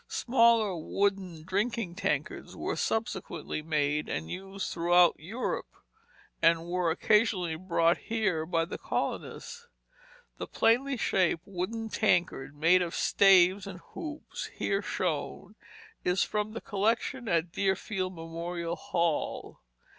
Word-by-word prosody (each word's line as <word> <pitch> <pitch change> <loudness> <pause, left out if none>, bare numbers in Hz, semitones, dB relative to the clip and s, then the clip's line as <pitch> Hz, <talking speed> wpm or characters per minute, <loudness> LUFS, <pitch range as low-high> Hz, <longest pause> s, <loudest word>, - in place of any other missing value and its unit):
Smaller 230 -5 +3
wooden 185 -1 -1
drinking 200 +1 -1
tankards - - -3
were - - -3
subsequently 220 -8 -2
made 150 -1 0
and 80 +1 -4
used 195 +1 -5
throughout 175 0 +5
Europe, 205 +11 -4 0.7
and 165 0 +4
were 175 0 0
occasionally 185 -1 +2
brought 170 -1 +2
here 215 -8 -1
by 165 -1 +1
the 170 - -7
colonists. 475 0 -4 0.7
The - - -4
plainly 255 +4 +2
shaped 185 -6 +1
wooden 200 +4 -4
tankard, 175 -10 +1
made 165 +5 +4
of 175 -1 -2
staves 190 0 +5
and 190 -2 -7 0.2
hoops 310 -3 -6
and - - -19
here 200 0 0
shown, 180 -1 -3 0.5
is 180 +2 +2
from 210 0 -2
the 230 - -5
collection 230 +5 -1
at 170 -3 +1
Deerfield 190 0 -1
Memorial 170 +1 -4
Hall. 170 -1 -2
185 Hz, 120 wpm, -29 LUFS, 170-215 Hz, 0.7 s, throughout